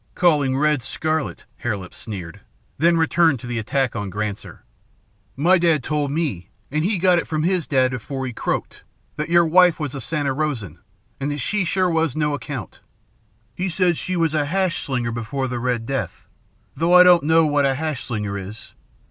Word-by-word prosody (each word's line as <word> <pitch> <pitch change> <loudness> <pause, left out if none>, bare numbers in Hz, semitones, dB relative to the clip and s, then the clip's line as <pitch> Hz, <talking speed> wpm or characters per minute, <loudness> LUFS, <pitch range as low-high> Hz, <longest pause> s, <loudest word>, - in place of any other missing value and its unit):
"Calling 145 -7 +3
red 150 -1 +2
scarlet," 155 +4 -3
Hare 110 -4 -2
Lip 90 -2 -10
sneered, 95 -7 -8 0.4
then 170 +1 +4
returned 160 -3 +3
to - - -10
the 120 -1 -3
attack 125 +4 -1
on 105 -3 -3
Granser. 105 +1 -5 0.7
"My 175 +7 +4
dad 165 -5 +2
told 150 0 -1
me, 140 - -2 0.2
an' 150 +1 0
he 195 +5 0
got 180 0 +4
it - - -5
from 155 -1 -1
his 180 -2 0
dad 130 -2 +2
afore 130 +2 -4
he 125 - -5
croaked, - - -3 0.3
that 150 +2 -3
your 170 0 +5
wife 175 +1 +5
was 150 -4 -3
a 135 - -5
Santa 145 +1 -1
Rosan, 125 - -3 0.4
an' 140 +1 -2
that 145 - -3
she 210 +9 -1
was 190 - 0
sure 170 -3 +1
no 150 -1 0
account. 145 - -6 0.7
He 185 +1 -2
said 180 0 +2
she 185 +4 -3
was 165 -3 +1
a 150 -2 +1
hash 185 +2 0
slinger 125 -4 -2
before 115 +4 -3
the 125 -1 -3
Red 120 -2 -1
Death, 135 +2 -4 0.5
though 165 +5 +3
I 180 - +10
don't 180 -1 +6
know 160 +2 +4
what 145 -2 +2
a 135 - +1
hash 155 -2 -3
slinger 105 -3 -3
is. 100 +3 -10
145 Hz, 190 wpm, -22 LUFS, 125-165 Hz, 0.7 s, I